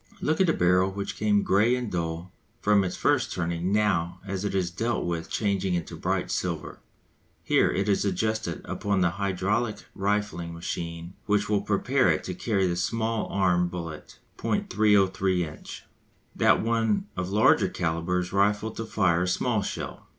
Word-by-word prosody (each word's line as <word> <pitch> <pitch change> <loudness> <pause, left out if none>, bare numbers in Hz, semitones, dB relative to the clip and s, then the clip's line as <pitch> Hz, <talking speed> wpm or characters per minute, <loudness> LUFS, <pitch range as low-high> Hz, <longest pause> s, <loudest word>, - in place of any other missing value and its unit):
Look 155 +4 +1
at 190 - +4
the 165 - +3
barrel 90 +1 +3
which 100 +1 -4
came 105 -1 +2
grey 110 +6 +3
and 125 -3 -4
dull 85 +1 -3 0.3
from 105 -2 +3
its 90 - -3
first - - +1
turning 85 +1 -2
now 90 -4 +1
as 95 -1 -3
it 100 -1 -2
is 90 -2 0
dealt 115 +6 -1
with 85 -2 -3
changing 100 -3 0
into 85 -2 -4
bright - - -2
silver. - - -3 0.6
Here - - +3
it 100 +1 -1
is 100 - +2
adjusted 105 -1 -1
upon 100 -2 -1
the 90 -2 +3
hydraulic 100 +4 -1
rifling 100 -4 -2
machine 85 +1 -5
which 105 0 +2
will 105 -2 +2
prepare 105 +3 +2
it 75 - +1
to 90 - -4
carry 95 +1 0
the 90 -1 0
small 115 +3 -1
arm 90 -2 +2
bullet 85 -3 -7 0.2
(.303 95 -3 +2
inch). 75 - -10 0.5
That - - +3
one 115 -2 +1
of 90 0 -3
larger 105 +2 +4
calibre 85 +2 -1
is 90 +1 -6
rifled 105 +2 +1
to 115 - -3
fire 90 -6 +2
a 90 - 0
small 110 +4 +1
shell. - - -6
95 Hz, 165 wpm, -26 LUFS, 90-105 Hz, 0.6 s, at